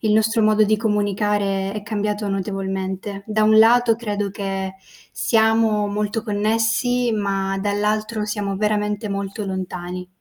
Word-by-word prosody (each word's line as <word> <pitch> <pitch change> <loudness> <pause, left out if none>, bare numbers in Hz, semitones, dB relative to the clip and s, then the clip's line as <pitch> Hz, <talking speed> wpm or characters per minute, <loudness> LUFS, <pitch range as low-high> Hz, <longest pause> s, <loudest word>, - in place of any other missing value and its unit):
il 215 -2 +1
nostro 220 +1 +3
modo 215 0 +4
di 215 +1 +2
comunicare 205 -2 0
è 210 0 -5
cambiato 210 -1 -2
notevolmente. 195 0 -3
Da 215 0 +1
un 215 0 +5
lato 230 +1 +5
credo 205 -3 -3
che 195 -1 -4 0.4
siamo 220 -2 +2
molto 210 +2 -2
connessi, 225 +3 +1
ma 195 -2 -1
dall'altro 210 +2 -1
siamo 205 -2 -2
veramente 210 0 -1
molto 200 +1 -4
lontani. 180 -1 -5
210 Hz, 130 wpm, -21 LUFS, 195-215 Hz, 0.4 s, un